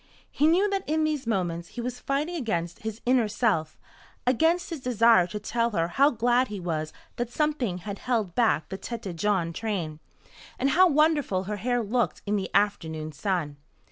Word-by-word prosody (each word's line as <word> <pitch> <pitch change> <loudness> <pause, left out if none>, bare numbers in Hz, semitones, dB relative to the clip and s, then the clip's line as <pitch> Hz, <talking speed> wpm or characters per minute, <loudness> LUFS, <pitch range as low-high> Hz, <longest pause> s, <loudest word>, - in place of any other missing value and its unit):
He 300 - +2
knew 360 +6 +4
that 390 -1 -1
in 315 0 +2
these 300 -5 -1
moments 175 -5 -1
he - - -2
was 250 +1 -4
fighting 285 +7 -1
against 175 - -2
his 220 0 -5
inner 245 -2 +3
self 200 -8 0 0.5
against 325 +9 +2
his 330 - -4
desire 230 -7 +4
to 210 +4 -5
tell 230 +2 0
her 170 -6 0
how 275 +10 +4
glad 245 +1 +2
he 205 -2 -6
was 155 -3 -3 0.3
that 240 -1 -2
something 270 - -1
had 200 +3 -7
held 225 -8 -1
back 220 -10 +2
the 190 +1 -5
Tête 225 -7 -6
Jaune 175 -2 0
train, 170 -8 -3 0.6
and 270 +2 +1
how 370 +5 +6
wonderful 295 - +2
her 210 +2 -4
hair 245 +3 0
looked 235 +3 -1
in 205 0 0
the 195 -2 -2
afternoon 160 -6 0
sun. 155 -3 -2
220 Hz, 180 wpm, -27 LUFS, 180-255 Hz, 0.6 s, how